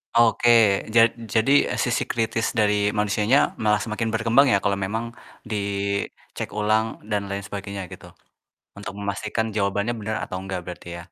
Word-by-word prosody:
Oke, 120 Hz, 0 st, +4 dB, 0.5 s
jad 115 Hz, 0 st, +6 dB, 0.2 s
jadi 115 Hz, +4 st, +3 dB, 0.3 s
sisi 120 Hz, -2 st, 0 dB
kritis 115 Hz, 0 st, -1 dB
dari 105 Hz, -1 st, +2 dB
manusianya 105 Hz, +5 st, +2 dB, 0.3 s
malah 105 Hz, 0 st, +3 dB
semakin 115 Hz, 0 st, -3 dB
berkembang 115 Hz, +5 st, +4 dB
ya -, -, +5 dB
kalau 100 Hz, -1 st, +1 dB
memang 115 Hz, +3 st, -3 dB, 0.4 s
dicek 100 Hz, -1 st, -3 dB
ulang 110 Hz, +1 st, +2 dB, 0.3 s
dan 100 Hz, -1 st, -1 dB
lain 100 Hz, 0 st, -4 dB
sebagainya 100 Hz, 0 st, -6 dB
gitu, -, -, -11 dB, 0.7 s
untuk 100 Hz, -, -7 dB
memastikan 105 Hz, +2 st, -3 dB
jawabannya 100 Hz, +2 st, 0 dB
benar 110 Hz, +1 st, -3 dB
atau 95 Hz, -, -5 dB
enggak 95 Hz, -1 st, -4 dB
berarti 90 Hz, -1 st, -9 dB
ya. -, -, -8 dB
105 Hz, 145 wpm, -23 LUFS, 100-115 Hz, 0.7 s, jad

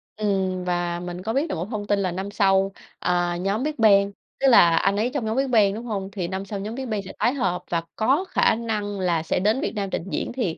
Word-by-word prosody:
ừm, 190 Hz, -3 st, -1 dB
và 175 Hz, -1 st, -1 dB
mình 180 Hz, +1 st, -6 dB
có 225 Hz, -, -2 dB
biết 295 Hz, +4 st, 0 dB
được -, -, -2 dB
một 170 Hz, +1 st, -3 dB
thông 210 Hz, -3 st, -4 dB
tin 205 Hz, -1 st, +2 dB
là 185 Hz, -2 st, 0 dB
năm 190 Hz, +3 st, -4 dB
sau, 195 Hz, -1 st, +3 dB, 0.3 s
à, 175 Hz, -1 st, 0 dB
nhóm 195 Hz, +6 st, -1 dB
Big 305 Hz, +1 st, -1 dB
Bang, 200 Hz, -3 st, +5 dB, 0.3 s
tức 270 Hz, -, +3 dB
là 170 Hz, -9 st, +7 dB
anh 195 Hz, +3 st, +2 dB
ấy 230 Hz, +4 st, +1 dB
trong 270 Hz, -6 st, -2 dB
nhóm 220 Hz, +3 st, -1 dB
Big 270 Hz, -1 st, +1 dB
Bang, 205 Hz, -4 st, +4 dB
đúng 230 Hz, +3 st, -6 dB
hông? 195 Hz, -4 st, -3 dB
Thì 185 Hz, -4 st, -3 dB
năm 190 Hz, +2 st, -4 dB
sau 200 Hz, 0 st, -5 dB
nhóm 215 Hz, +3 st, -5 dB
Big 260 Hz, -1 st, -5 dB
Bang 215 Hz, -2 st, -1 dB
sẽ 190 Hz, -, -8 dB
tái 245 Hz, -, +2 dB
hợp 185 Hz, -10 st, -1 dB
và 170 Hz, -1 st, 0 dB
có 275 Hz, +11 st, +2 dB
khả -, -, +3 dB
năng 210 Hz, -3 st, -3 dB
là 170 Hz, -3 st, +1 dB
sẽ -, -, 0 dB
đến 215 Hz, +7 st, +1 dB
Việt -, -, -2 dB
Nam 200 Hz, -2 st, -2 dB
trình -, -, -3 dB
diễn -, -, -2 dB
thì 215 Hz, -11 st, -2 dB
200 Hz, 265 wpm, -24 LUFS, 185-225 Hz, 0.3 s, là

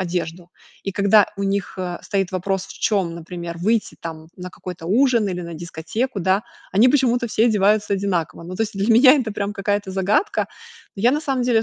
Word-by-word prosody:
одежду. 175 Hz, -1 st, -4 dB, 0.3 s
И 195 Hz, -, -3 dB
когда 200 Hz, +1 st, +5 dB
у 200 Hz, -, -3 dB
них, 200 Hz, 0 st, -1 dB
э, 180 Hz, -1 st, -3 dB
стоит 195 Hz, -2 st, -1 dB
вопрос, 190 Hz, +1 st, -2 dB
в -, -, -10 dB
чем, 190 Hz, -6 st, +1 dB
например, 170 Hz, 0 st, -7 dB
выйти 215 Hz, +5 st, 0 dB
там 160 Hz, -1 st, -7 dB
на 180 Hz, 0 st, -7 dB
какой-то 180 Hz, -2 st, -8 dB
ужин, 235 Hz, +2 st, +3 dB
или 180 Hz, -1 st, -3 dB
на 170 Hz, -1 st, -7 dB
дискотеку, 175 Hz, +8 st, -4 dB
да, 190 Hz, +3 st, +2 dB, 0.3 s
они 215 Hz, +7 st, +5 dB
почему-то 250 Hz, -3 st, +2 dB
все 225 Hz, 0 st, +2 dB
одеваются 210 Hz, -1 st, +2 dB
одинаково. 180 Hz, -4 st, -2 dB
Ну 180 Hz, +2 st, -7 dB
то 225 Hz, -, 0 dB
есть 220 Hz, -1 st, -4 dB
для 205 Hz, +4 st, +3 dB
меня 255 Hz, +4 st, +8 dB
это 245 Hz, -7 st, -1 dB
прям 205 Hz, 0 st, -3 dB
какая-то 205 Hz, -1 st, -2 dB
загадка. 195 Hz, -, +1 dB, 0.5 s
Я, 220 Hz, +5 st, +3 dB
на 295 Hz, +3 st, 0 dB
самом 270 Hz, -4 st, -1 dB
деле, 235 Hz, -2 st, +3 dB
195 Hz, 195 wpm, -21 LUFS, 180-225 Hz, 0.5 s, меня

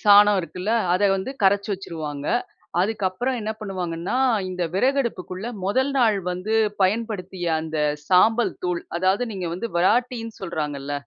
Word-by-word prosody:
சாணம் 205 Hz, -1 st, +7 dB
இருக்குல்ல. 180 Hz, +4 st, -3 dB, 0.2 s
அத 185 Hz, -, 0 dB
வந்து 190 Hz, +7 st, -4 dB
கரைச்சு 200 Hz, +1 st, +3 dB
வச்சுருவாங்க. 155 Hz, -6 st, -5 dB, 0.5 s
அதுக்கப்பறம் 215 Hz, +5 st, -1 dB
என்ன 215 Hz, 0 st, -2 dB
பண்ணுவாங்கன்னா, 180 Hz, 0 st, -3 dB, 0.3 s
இந்த 180 Hz, -1 st, -3 dB
விறகு 265 Hz, +7 st, +2 dB
அடுப்புக்குள்ள 185 Hz, -2 st, -5 dB, 0.2 s
மொதல் 260 Hz, +8 st, +1 dB
நாள் 220 Hz, -5 st, +4 dB
வந்து 185 Hz, +5 st, -2 dB, 0.3 s
பயன்படுத்திய 190 Hz, -3 st, -1 dB
அந்த 160 Hz, -1 st, -4 dB, 0.3 s
சாம்பல் 220 Hz, +5 st, +4 dB
தூள், 180 Hz, -1 st, -1 dB, 0.2 s
அதாவது 190 Hz, +5 st, +2 dB
நீங்க 185 Hz, -4 st, -3 dB
வந்து 210 Hz, +7 st, -4 dB
விராட்டின்னு 230 Hz, +4 st, +1 dB
சொல்றாங்கல்ல, 150 Hz, -6 st, -4 dB
190 Hz, 130 wpm, -23 LUFS, 180-220 Hz, 0.5 s, சாணம்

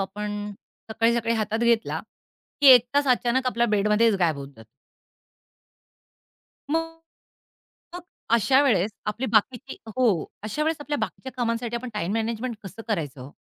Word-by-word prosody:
आपण 205 Hz, +1 st, -4 dB, 0.4 s
सकाळी-सकाळी 230 Hz, +1 st, +1 dB
हातात 220 Hz, 0 st, -1 dB
घेतला 235 Hz, -1 st, +1 dB, 0.6 s
की 285 Hz, -, +4 dB
1 245 Hz, -1 st, +6 dB
तास 285 Hz, 0 st, +3 dB
अचानक 250 Hz, +1 st, +1 dB
आपल्या 235 Hz, -1 st, +1 dB
बेडमध्येच 210 Hz, +1 st, +3 dB
गायब 165 Hz, -5 st, +1 dB
होत 140 Hz, 0 st, -7 dB
जातो. 110 Hz, -, -14 dB, 2.1 s
मग 325 Hz, 0 st, -2 dB, 0.9 s
मग 355 Hz, -, -7 dB, 0.3 s
अशा 265 Hz, +5 st, +3 dB
वेळेस 210 Hz, -7 st, +2 dB, 0.2 s
आपली 230 Hz, +5 st, -2 dB
बाकीची 245 Hz, +5 st, +1 dB
हो, 220 Hz, -7 st, +1 dB, 0.2 s
अशावेळेस 305 Hz, +9 st, -1 dB
आपल्या 290 Hz, 0 st, -3 dB
बाकीच्या 260 Hz, -, -5 dB
कामांसाठी 235 Hz, -1 st, -2 dB
आपण 250 Hz, +1 st, -6 dB
टाईम 195 Hz, -1 st, -2 dB
मॅनेजमेंट 225 Hz, +1 st, -2 dB
कसं 210 Hz, +4 st, -9 dB
करायचं 150 Hz, -, -3 dB
हो? 140 Hz, -, -12 dB
230 Hz, 135 wpm, -25 LUFS, 210-255 Hz, 2.1 s, 1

